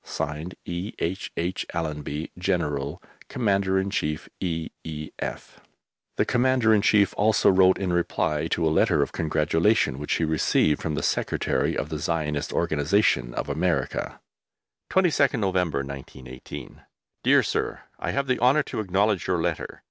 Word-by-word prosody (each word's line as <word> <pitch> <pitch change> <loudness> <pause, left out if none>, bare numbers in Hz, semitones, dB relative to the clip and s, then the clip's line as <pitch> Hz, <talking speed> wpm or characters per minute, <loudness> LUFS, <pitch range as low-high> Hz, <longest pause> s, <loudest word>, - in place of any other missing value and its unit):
(Signed) 75 +5 -4
E. 90 +4 -4
H. 90 +4 -3
H. 90 +2 -1
ALLENBY, 75 -1 -3
General, 85 -4 -1 0.3
Commander 100 -5 +1
in 95 +1 0
Chief, 75 -6 -2
E.E.F. 80 -2 -5 0.6
The - - +3
Commander 125 -2 +3
in 105 - +4
Chief 100 -1 +4
also 105 -1 +4
wrote 95 0 +5
in 95 -3 -1
reply 80 -2 0
to 85 0 0
a 80 - +2
letter - - +3
of - - -5
congratulation 80 0 +1
which 75 - -2
he - - 0
received 80 -1 +2
from 80 -2 -2
the - - -2
Secretary - - 0
of - - -3
the 75 - -4
Zionist 75 -2 -2
Organization 75 - +1
of - - -3
America: 80 -1 -1 0.7
22D 155 -8 +3
NOVEMBER, 90 -8 0
1918. 65 -2 -9 0.4
DEAR - - +5
SIR, - - -2 0.2
I - - -3
have 140 0 0
the 130 -1 0
honour 130 +5 +4
to - - -5
acknowledge 100 0 +1
your 90 -2 +1
letter.... 85 -1 -3
85 Hz, 145 wpm, -25 LUFS, 75-100 Hz, 0.7 s, wrote